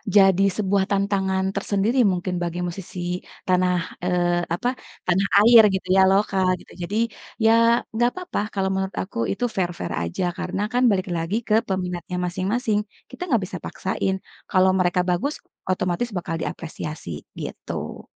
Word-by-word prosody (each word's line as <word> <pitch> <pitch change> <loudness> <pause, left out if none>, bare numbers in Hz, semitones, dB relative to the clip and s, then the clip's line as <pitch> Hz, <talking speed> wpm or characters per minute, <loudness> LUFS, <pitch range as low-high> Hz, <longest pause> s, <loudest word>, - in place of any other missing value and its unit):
jadi 195 -1 +6
sebuah 200 -2 +2
tantangan 195 -1 +1
tersendiri 205 +5 0
mungkin 185 -2 0
bagi 170 0 -3
musisi 180 +1 -7 0.5
tanah, 180 0 +3 0.3
eee, 175 -1 +1
apa, 240 +8 -1 0.4
tanah 190 +2 +2 0.2
air 235 -1 +10
gitu 190 -1 -3
ya 190 - +6
lokal 195 -1 +2
gitu, - - -16
jadi 200 +5 -2 0.5
ya 225 - +7 0.4
enggak 240 +2 +3
papa 365 -1 -3
kalau 195 -1 0
menurut 190 0 -2
aku, 190 - -10
itu 245 - -1
fair-fair 175 - -2
aja 85 - -3
karena 195 - -3
kan 250 +1 +3
balik 190 -1 0
lagi 165 +5 -2
ke 215 - +3
peminatnya 180 -2 -3
masing-masing, 205 +5 0 0.3
kita - - -13
nggak 235 - +4
bisa 185 - -6
paksain 190 0 -2 0.4
kalau 185 -1 +5
mereka 180 0 +2
bagus 245 +12 0 0.4
otomatis 185 +5 -1
bakal 165 -2 -3
diapresiasi 155 - -6 0.2
gitu. - - -6
190 Hz, 145 wpm, -23 LUFS, 180-200 Hz, 0.5 s, air